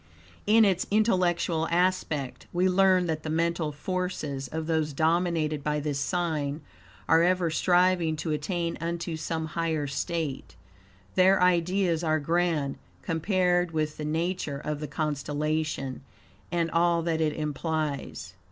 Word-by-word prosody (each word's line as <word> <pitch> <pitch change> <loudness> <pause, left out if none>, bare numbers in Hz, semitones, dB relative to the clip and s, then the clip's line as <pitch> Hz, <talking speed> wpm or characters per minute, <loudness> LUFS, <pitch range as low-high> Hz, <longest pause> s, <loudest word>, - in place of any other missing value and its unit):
In 220 +1 +6
its 185 -2 +1
intellectual 180 -6 +2
aspect, 170 -6 0
we 180 +2 +2
learn 185 -1 +4
that 160 -2 -2
the 155 - -5
mental 165 0 0
forces 150 -4 -3
of 160 +4 -4
those 160 -2 0
dominated 160 -1 +1
by 150 0 0
this 145 -1 -2
sign 155 -3 -1 0.5
are 165 0 +5
ever 180 -1 +2
striving 175 -1 +3
to 155 +1 -3
attain 165 +3 -2
unto 170 0 -3
some 160 0 -3
higher 160 -3 -1
state. 145 0 -3 0.6
Their 190 +1 +5
ideas 180 -1 +2
are 155 -1 +2
grand, 165 -2 0 0.2
compared 175 0 +1
with 155 -1 -1
the 150 - -5
nature 160 -1 -2
of 150 +1 -4
the 150 - -4
constellation, 150 -1 -2 0.5
and 170 -2 0
all 170 0 +2
that 165 -1 0
it 155 -1 +1
implies. 150 -1 -3
165 Hz, 135 wpm, -27 LUFS, 150-175 Hz, 0.6 s, In